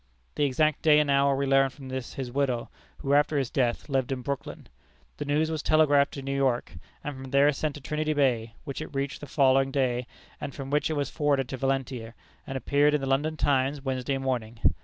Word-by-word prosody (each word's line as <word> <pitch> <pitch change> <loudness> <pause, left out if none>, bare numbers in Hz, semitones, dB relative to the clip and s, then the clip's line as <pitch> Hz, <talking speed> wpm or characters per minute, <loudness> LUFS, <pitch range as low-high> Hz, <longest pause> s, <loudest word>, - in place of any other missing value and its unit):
The 145 - +1
exact 155 +2 +1
day 150 -1 +6
and 150 -2 +2
hour 140 0 +3
we 140 +1 0
learned 135 -1 +3
from 135 -3 -10
his 130 0 -5
widow, 130 -3 -1 0.3
who 140 - -1
after 145 +1 +3
his 135 -3 -1
death 120 -3 0
lived 135 -3 0
in 130 -2 -3
Brooklyn. 140 -3 -5 0.5
The 145 - -4
news 150 +2 +1
was 155 -2 -2
telegraphed 145 -2 +4
to 140 - -6
New 135 +1 -2
York, 130 -7 0 0.3
and 145 -1 -4
from 130 0 -8
there 140 +2 +5
sent 150 +1 -3
to 145 - -9
Trinity 155 +3 -1
Bay, 120 -6 +1
which 140 +1 -5
it 155 - -8
reached 140 0 -2
the 145 - -7
following 135 -1 +3
day, 125 -3 0 0.3
and 140 - -5
from 135 -1 -6
which 150 +2 +1
it - - 0
was 145 -3 -2
forwarded 145 -4 +1
to 130 - -4
Valentia, 130 -3 -2 0.3
and 135 - -3
appeared 145 +2 +3
in 150 - 0
the - - -2
London 145 +4 0
Times 135 0 +1
Wednesday 135 0 -1
morning. 125 -4 -3
135 Hz, 215 wpm, -27 LUFS, 130-145 Hz, 0.5 s, day